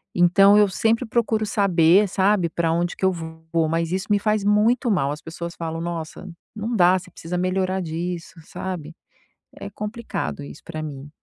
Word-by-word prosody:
então 195 Hz, +4 st, +6 dB
eu 210 Hz, -1 st, +6 dB
sempre 225 Hz, +4 st, +1 dB
procuro 220 Hz, -1 st, 0 dB
saber, 195 Hz, -1 st, +4 dB
sabe, 190 Hz, -2 st, +2 dB
pra 165 Hz, 0 st, 0 dB
onde 175 Hz, +1 st, -1 dB
que -, -, -2 dB
eu 190 Hz, -, +4 dB
vou, 160 Hz, -1 st, -3 dB
mas 165 Hz, +1 st, -1 dB
isso 190 Hz, +2 st, -2 dB
me 205 Hz, -, +4 dB
faz 215 Hz, 0 st, 0 dB
muito 220 Hz, +4 st, +3 dB
mal. 140 Hz, -8 st, +1 dB
As 150 Hz, +1 st, -6 dB
pessoas 170 Hz, +1 st, -7 dB
falam: 165 Hz, 0 st, -4 dB
"Nossa, 170 Hz, +1 st, -5 dB, 0.3 s
não 220 Hz, +3 st, -3 dB
dá. 185 Hz, -1 st, +5 dB
Você 185 Hz, 0 st, -14 dB
precisa 175 Hz, +2 st, -5 dB
melhorar 185 Hz, +1 st, 0 dB
disso", 170 Hz, +1 st, -5 dB
sabe? 165 Hz, -2 st, -6 dB, 0.7 s
É 200 Hz, -, -6 dB
complicado 210 Hz, -, -5 dB
isso 75 Hz, 0 st, -11 dB
pra 155 Hz, -2 st, -6 dB
mim. 145 Hz, -2 st, -7 dB
180 Hz, 175 wpm, -23 LUFS, 165-205 Hz, 0.7 s, então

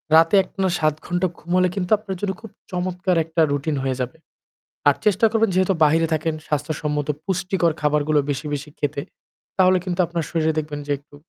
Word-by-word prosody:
রাতে 165 Hz, +4 st, +6 dB
একটানা 190 Hz, 0 st, -2 dB
৭ 155 Hz, -1 st, +2 dB
ঘন্টা 175 Hz, +1 st, 0 dB
ঘুম 175 Hz, -, -10 dB
হলে 185 Hz, 0 st, +4 dB
কিন্তু 185 Hz, 0 st, -3 dB
আপনার 200 Hz, -2 st, -6 dB
জন্য 200 Hz, -2 st, 0 dB
খুব 225 Hz, -, -9 dB, 0.2 s
চমৎকার 180 Hz, 0 st, -1 dB
একটা 165 Hz, +1 st, 0 dB
routine 145 Hz, +1 st, -1 dB
হয়ে 130 Hz, -1 st, 0 dB
যাবে। 125 Hz, +5 st, -4 dB, 0.7 s
আর -, -, +6 dB
চেষ্টা 210 Hz, +1 st, +4 dB
করবেন 225 Hz, -2 st, +2 dB
যেহেতু 185 Hz, +1 st, +3 dB
বাহিরে 160 Hz, +2 st, +4 dB
থাকেন 160 Hz, +1 st, 0 dB
স্বাস্থ্যসম্মত 150 Hz, 0 st, -2 dB, 0.2 s
পুষ্টিকর 180 Hz, -2 st, +1 dB
খাবারগুলো 150 Hz, 0 st, +2 dB
বেশি, 135 Hz, 0 st, -2 dB
বেশি 145 Hz, +1 st, -4 dB
খেতে। 145 Hz, -1 st, -1 dB, 0.6 s
তাহলে 185 Hz, 0 st, +5 dB
কিন্তু 180 Hz, 0 st, -3 dB
আপনার 170 Hz, -1 st, -3 dB
শরীরে 160 Hz, -1 st, +1 dB
দেখবেন 150 Hz, -1 st, -5 dB
যে -, -, -2 dB
একটু 145 Hz, 0 st, -19 dB
165 Hz, 180 wpm, -22 LUFS, 150-185 Hz, 0.7 s, রাতে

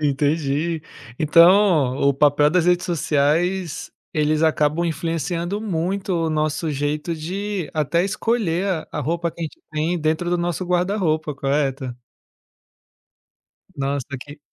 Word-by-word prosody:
Entendi. 150 Hz, +2 st, 0 dB, 0.4 s
Então, 165 Hz, -4 st, +5 dB
o 140 Hz, -, +3 dB
o 140 Hz, -, +2 dB
papel 145 Hz, +1 st, +4 dB
das 175 Hz, 0 st, +2 dB
redes 180 Hz, 0 st, +2 dB
sociais, 170 Hz, +2 st, 0 dB, 0.2 s
eles 155 Hz, +1 st, +1 dB
acabam 155 Hz, +1 st, +2 dB
influenciando 170 Hz, +4 st, -2 dB
muito 190 Hz, 0 st, -2 dB
o -, -, -1 dB
nosso 155 Hz, +1 st, -1 dB
jeito 150 Hz, +3 st, -2 dB
de 185 Hz, +2 st, -4 dB
até 160 Hz, +3 st, +1 dB
escolher 200 Hz, -3 st, 0 dB
a 175 Hz, -5 st, -2 dB
a -, -, -2 dB
roupa 170 Hz, +4 st, -1 dB
que 170 Hz, -, -14 dB
a -, -, -2 dB
gente 155 Hz, -, -9 dB
tem 160 Hz, +3 st, -1 dB
dentro 160 Hz, +3 st, 0 dB
do 175 Hz, -, +1 dB
nosso 175 Hz, +1 st, -2 dB
guarda-roupa, 175 Hz, -4 st, 0 dB
correto? 135 Hz, -2 st, -1 dB, 1.8 s
Nossa 140 Hz, 0 st, -2 dB
que 145 Hz, +3 st, -11 dB
160 Hz, 130 wpm, -22 LUFS, 150-175 Hz, 1.8 s, Então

